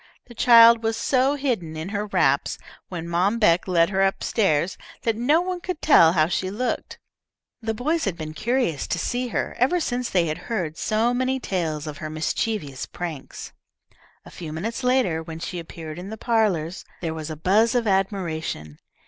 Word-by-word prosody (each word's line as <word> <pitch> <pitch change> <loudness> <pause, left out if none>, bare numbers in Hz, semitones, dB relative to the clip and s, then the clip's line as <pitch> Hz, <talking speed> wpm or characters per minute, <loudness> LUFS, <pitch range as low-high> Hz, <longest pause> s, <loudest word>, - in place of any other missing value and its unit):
The 240 - -13
child 230 -1 +7
was 225 0 -1
so 265 +3 +2
hidden 225 - -2
in 160 +4 -5
her 210 0 -3
wraps - - +1 0.3
when 170 -2 -5
Mom 180 +6 +1
Beck 180 -6 +3
led 170 0 +3
her 195 0 +1
up 195 0 +1
stairs, 185 -4 +1 0.3
that 230 -1 +1
no 285 +9 +3
one 360 0 -3
could 365 -3 -4
tell 165 - +6
how 155 -3 +4
she 185 +2 -1
looked. 235 +6 -3 0.6
The 225 -1 -2
boys 310 +8 0
had 190 -4 -2
been 155 -2 -6
curious 230 - -1
to - - -1
see 245 +8 -2
her, 235 - -3
ever 270 +9 +3
since 245 -6 -2
they 180 -3 +2
had 155 +1 -3
heard 175 -9 -2
so 220 +6 +1
many 255 +1 0
tales 165 - -2
of 150 -2 -7
her 155 - -5
mischievous 155 - -2
pranks. 165 -6 -7 0.7
A - - -12
few 165 -3 -7
minutes 225 +11 -4
later, 250 -11 +2
when 160 0 -8
she 175 +2 -5
appeared 165 -1 -8
in 185 +2 -7
the 220 - -6
parlours, 200 -8 0 0.2
there 165 -2 -2
was 160 -1 -6
a 155 - -4
buzz 215 - +3
of 240 -2 +2
admiration. 170 - -2
195 Hz, 185 wpm, -24 LUFS, 165-235 Hz, 0.7 s, child